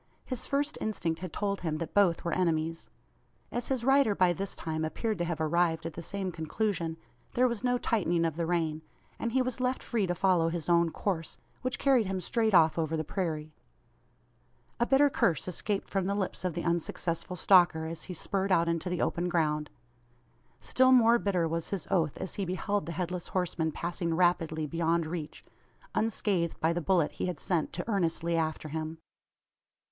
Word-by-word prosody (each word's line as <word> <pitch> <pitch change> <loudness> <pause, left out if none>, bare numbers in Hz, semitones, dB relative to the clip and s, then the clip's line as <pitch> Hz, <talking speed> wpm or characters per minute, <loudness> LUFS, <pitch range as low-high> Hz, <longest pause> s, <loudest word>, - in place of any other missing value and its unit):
His 255 -3 -4
first 285 +2 -1
instinct 170 -6 -2
had 185 -2 -6
told 200 +2 -2
him 160 -3 -1
that 165 0 -5
both 190 -5 +3
were 170 - 0
enemies. 165 -2 0 0.6
As 240 - -2
his 260 -3 -1
rider 270 -6 +4
by 180 -2 +4
this 195 +2 -4
time 160 -1 -3
appeared 210 +6 -2
to 175 - 0
have 170 -2 -3
arrived 160 0 +1
at 165 - -4
the 170 - -6
same 190 +2 -3
conclusion, 165 0 -2 0.4
there 255 +1 +4
was 235 -2 -3
no 245 0 +2
tightening 175 -8 +1
of 160 -2 -1
the 165 0 -2
rein; 160 -3 0 0.4
and 230 - -2
he 260 0 +3
was 255 -1 -3
left 255 +1 0
free 220 -5 0
to 175 - -1
follow 175 -3 +3
his 165 -2 -4
own 170 -1 +4
course 165 -2 -3 0.2
which 255 0 -2
carried 260 -7 +3
him 190 0 -2
straight 220 +2 +1
off 160 -1 +5
over 160 0 0
the 155 - -1
prairie. 155 -3 -3 1.3
A 240 - +2
bitter 275 +2 +5
curse 175 - +1
escaped 195 +3 -2
from 195 -2 -1
the 200 - 0
lips 195 -2 -2
of 180 -4 -1
the 170 - -2
unsuccessful 170 +1 -1
stalker 175 -3 +5
as 160 -1 -5
he 180 - -6
spurred 195 +3 -1
out 170 -2 +4
into 170 +1 -1
the 180 -1 0
open 175 +1 -1
ground. 150 -3 0 0.9
Still 260 0 +3
more 235 -2 +6
bitter 180 -6 +1
was 165 0 -3
his 195 -5 -3
oath, 165 -5 +1
as 190 - -4
he 200 - -3
beheld 195 +2 -1
the - - -3
Headless 180 0 -3
Horseman 175 -3 -1
passing 170 +1 -2
rapidly 165 -3 +2
beyond 165 +2 0
reach 155 -1 -6 0.5
unscathed 200 -6 0
by 160 +1 +2
the 175 - -2
bullet 170 -2 +2
he - - -3
had 180 - -4
sent 170 -4 0
to 175 +4 -4
earnestly 170 -5 0
after 160 -1 -1
him. 160 +1 -4
175 Hz, 190 wpm, -30 LUFS, 165-200 Hz, 1.3 s, more